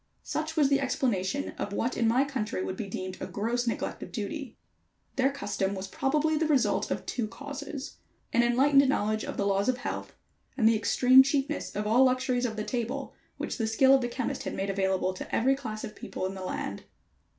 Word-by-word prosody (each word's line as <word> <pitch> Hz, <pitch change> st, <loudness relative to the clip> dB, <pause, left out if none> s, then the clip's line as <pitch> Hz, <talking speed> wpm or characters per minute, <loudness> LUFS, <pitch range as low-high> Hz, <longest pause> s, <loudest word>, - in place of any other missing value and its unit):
Such 310 Hz, +1 st, -3 dB
was 295 Hz, -3 st, +5 dB
the 280 Hz, 0 st, +3 dB
explanation 265 Hz, -2 st, 0 dB
of 200 Hz, -, -3 dB
what 235 Hz, +4 st, -1 dB
in 230 Hz, -, +2 dB
my 245 Hz, +4 st, +4 dB
country 235 Hz, -9 st, -3 dB
would 185 Hz, -, -3 dB
be 205 Hz, +1 st, -5 dB
deemed 185 Hz, -1 st, -5 dB
a -, -, -3 dB
gross 235 Hz, +4 st, -1 dB
neglect 230 Hz, -, -2 dB
of -, -, -7 dB
duty. -, -, -5 dB, 0.6 s
Their 270 Hz, +1 st, +3 dB
custom 200 Hz, -8 st, -2 dB
was 190 Hz, 0 st, -5 dB
probably 300 Hz, +8 st, +1 dB
the 320 Hz, 0 st, +1 dB
result 280 Hz, -5 st, +2 dB
of -, -, -3 dB
two 235 Hz, -3 st, -2 dB
causes: 285 Hz, +3 st, -7 dB, 0.4 s
an 235 Hz, -, +5 dB
enlightened 270 Hz, +3 st, +4 dB
knowledge 215 Hz, -4 st, 0 dB
of -, -, -5 dB
the 200 Hz, -, 0 dB
laws 200 Hz, +2 st, +2 dB
of 255 Hz, -, +1 dB
health, -, -, -5 dB, 0.4 s
and 225 Hz, -4 st, +4 dB
the 225 Hz, -, +5 dB
extreme 255 Hz, +4 st, +6 dB
cheapness 275 Hz, +2 st, -1 dB
of 210 Hz, +1 st, -2 dB
all 230 Hz, +5 st, +5 dB
luxuries 255 Hz, -1 st, +2 dB
of 220 Hz, -, -5 dB
the 215 Hz, -, -3 dB
table 240 Hz, 0 st, -3 dB, 0.2 s
which -, -, -4 dB
the 225 Hz, -, +1 dB
skill 265 Hz, +5 st, +5 dB
of 270 Hz, -, +5 dB
the 240 Hz, -, 0 dB
chemist 250 Hz, 0 st, -3 dB
had -, -, -4 dB
made 195 Hz, +1 st, -1 dB
available 190 Hz, -1 st, 0 dB
to 185 Hz, -, -5 dB
every 265 Hz, +4 st, +3 dB
class 220 Hz, -6 st, -6 dB
of 215 Hz, -, -6 dB
people -, -, -5 dB
in 190 Hz, -, -3 dB
the 190 Hz, -, -7 dB
land. 185 Hz, -, -4 dB
245 Hz, 210 wpm, -28 LUFS, 210-270 Hz, 0.6 s, extreme